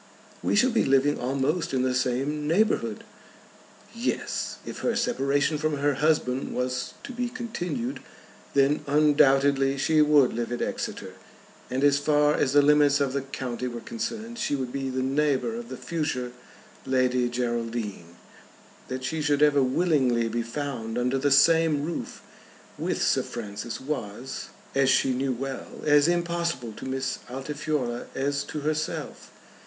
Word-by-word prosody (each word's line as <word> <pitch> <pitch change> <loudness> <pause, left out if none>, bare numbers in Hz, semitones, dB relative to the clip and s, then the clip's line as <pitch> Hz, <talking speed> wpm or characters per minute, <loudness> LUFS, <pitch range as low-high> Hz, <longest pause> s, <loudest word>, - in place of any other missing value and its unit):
"We - - +1
shall 250 +5 +4
be 230 - +2
living 135 +2 +3
almost 135 +5 -1
in 130 - +1
the 130 0 +1
same 135 +4 -1
neighbourhood!" 210 +8 +1 0.9
Yes; 235 +2 -2
if - - -7
her 235 - 0
separation 150 - +1
from 155 -1 0
her 145 +1 +2
husband 135 -3 0
was 125 0 -2
to - - -7
be 245 0 -2
continued, 235 0 -4 0.6
then 140 +2 +3
undoubtedly 140 -2 +4
she 155 +3 +3
would 150 -3 +5
live 120 +1 -3
at 120 - -2
Exeter, - - -4 0.6
and, 130 +2 -1
as 140 0 +5
far 150 0 +3
as 135 -2 +1
the 145 0 +6
limits 145 -1 +5
of 140 -2 0
the 140 - 0
county 130 -2 -4
were 120 -1 -5
concerned, 230 - -5
she 145 - 0
would 130 -3 -4
be 135 -1 -2
the 130 0 -1
neighbour 145 - +1
of 235 +1 -6
the - - -6
future 145 -7 -3 0.5
Lady 125 -2 +1
Geraldine. 115 -7 -3 0.7
That 130 0 -5
she 160 +4 -2
should 145 0 +2
ever 145 -2 +5
willingly 130 -4 +2
be 120 +1 -1
found 115 -2 -4
under 125 +2 +1
the 145 - +2
same 155 +1 +4
roof 170 - -5 0.5
with - - -1
Sir - - +3
Francis 110 0 -6
was, 130 -3 -5 0.2
as 135 -1 +3
she 135 0 +3
knew 130 +1 0
well, 135 +2 -4 0.2
as 145 0 +5
impossible 170 -7 -1
to - - -7
Miss 130 0 -2
Altifiorla 135 -2 -3
as 140 +1 0
to 150 - -5
herself. 155 +1 -3
140 Hz, 150 wpm, -26 LUFS, 130-155 Hz, 0.9 s, the